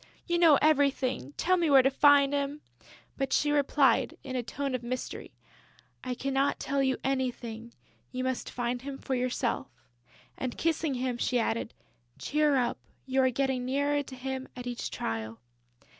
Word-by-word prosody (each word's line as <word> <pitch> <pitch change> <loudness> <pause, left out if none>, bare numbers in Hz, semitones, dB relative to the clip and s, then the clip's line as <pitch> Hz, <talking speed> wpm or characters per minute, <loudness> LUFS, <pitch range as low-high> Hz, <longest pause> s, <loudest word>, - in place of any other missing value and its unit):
You 345 -1 0
know 325 -5 +7
everything: 275 - +2
tell 370 +1 +2
me 335 -3 +1
where 270 -2 +7
to 270 - +3
find 285 0 +5
him!" 285 +1 -2 0.6
But 270 -1 -2
she 295 - +2
replied, 280 -3 +2
in 260 -2 -5
a 250 - 0
tone 275 +3 -4
of 255 - -1
mystery: 250 +1 -5 0.7
"I 255 -1 -3
cannot 275 +2 0
tell 275 0 0
you 265 -1 +1
anything. 240 -3 -3 0.4
You 255 0 -3
must 260 -1 -2
find 245 0 -2
him 275 0 -6
for 270 - -4
yourself." 250 -1 -1 0.7
And, 255 -2 -3
kissing 320 -3 0
him, 250 -1 -2
she 250 - +1
added, 230 -1 -1 0.4
"Cheer 300 -1 +1
up; 245 -2 0 0.3
you 265 0 +2
are 260 - +4
getting 265 0 0
nearer 285 +3 +1
to 270 -2 -9
him 265 +1 -5
at 245 0 -7
each 245 -1 -4
trial." 110 0 -4
265 Hz, 165 wpm, -29 LUFS, 250-280 Hz, 0.7 s, know